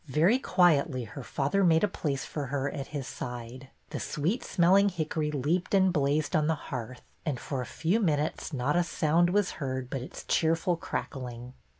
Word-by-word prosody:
Very 165 - +3
quietly 155 - +3
her 115 +5 -8
father 145 +10 0
made 165 -1 +4
a - - +5
place 140 -8 -3
for 145 -3 -4
her 140 +1 -1
at 140 -2 -5
his 145 -3 -5
side. 125 0 -7 0.2
The - - -3
sweet 170 - -1
smelling 190 +4 +4
hickory 155 -3 -2
leaped 150 +7 0
and 190 -2 +4
blazed 145 +1 +1
on 155 -1 +3
the 160 - +2
hearth, 130 -4 -7 0.2
and 145 -6 -2
for 135 -3 -3
a 125 - -5
few 175 +8 0
minutes 155 -5 0
not 140 +1 0
a 175 - +4
sound 170 +1 +2
was 200 +1 +2
heard 130 -2 -3
but 135 - -2
its 130 - -8
cheerful 165 +2 +2
crackling. 125 -6 -5
150 Hz, 185 wpm, -29 LUFS, 135-175 Hz, 0.2 s, a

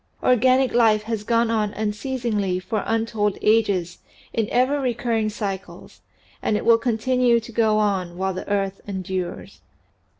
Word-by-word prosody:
Organic 255 +1 +3
life 220 -3 +4
has 220 -1 -3
gone 230 +1 +1
on 215 -2 0
unceasingly 215 -3 -2
for 210 +3 -3
untold 225 -2 0
ages 200 -6 +1 0.3
in 225 -2 -1
ever 260 +4 +2
recurring 235 -3 0
cycles 200 -3 -6 0.4
and 210 - +1
it - - -5
will 230 0 +6
continue 240 +1 +2
to 230 +1 -11
go 220 -1 +2
on 190 -5 0
while 190 +1 -1
the 185 - -7
earth 195 -1 -1
endures. 185 -2 -5
220 Hz, 140 wpm, -23 LUFS, 200-235 Hz, 0.4 s, will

